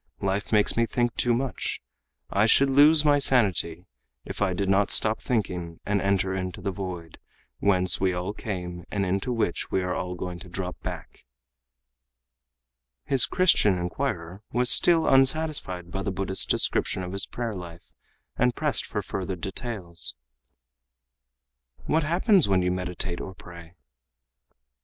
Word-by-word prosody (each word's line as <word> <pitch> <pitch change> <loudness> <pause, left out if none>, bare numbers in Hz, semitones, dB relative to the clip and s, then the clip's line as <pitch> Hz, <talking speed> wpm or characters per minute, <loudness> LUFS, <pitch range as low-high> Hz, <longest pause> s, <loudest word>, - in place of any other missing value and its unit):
Life 100 +1 -2
makes 105 -2 +3
me 115 0 +2
think 120 -1 0
too 120 - +1
much. 130 0 -3 0.5
I 100 +3 +3
should 135 +4 +4
lose 150 +3 +6
my 145 -1 +4
sanity, 95 - +1 0.4
if - - -7
I 100 -2 +2
did 100 +1 -2
not 100 +1 +2
stop 110 0 +3
thinking 90 -8 -3
and 100 -1 0
enter 95 -1 0
into 95 -1 -4
the 100 +1 -3
'void', 90 -4 -7 0.4
whence 95 -2 +3
we 95 -1 +2
all 90 +3 -3
came 90 -5 -6
and 100 -1 -1
into 95 +6 -1
which 110 -7 -2
we 95 - 0
all 90 0 -3
are - - -7
going 90 0 -6
to 90 -1 -12
drop 90 0 -5
back." - - -8 1.8
His 135 -2 +4
Christian 160 - +4
inquirer 90 -1 -4 0.2
still 165 +6 +5
was - - +2
unsatisfied 135 - +1
by 95 - -3
the 100 - -2
Buddhist's 95 0 -1
description 95 - +1
of 90 - -6
his 100 +1 -2
prayer 120 -2 -4
life, 85 -3 -10 0.4
and 125 0 +2
pressed - - +1
further - - -4
for 95 -1 -4
details. 90 - -5 1.7
"What 160 - +1
happens 175 - +3
when 95 -2 +2
you 90 - +1
meditate 90 -1 -3
or 95 - -8
pray?" 85 -1 -13
95 Hz, 150 wpm, -26 LUFS, 90-120 Hz, 1.8 s, lose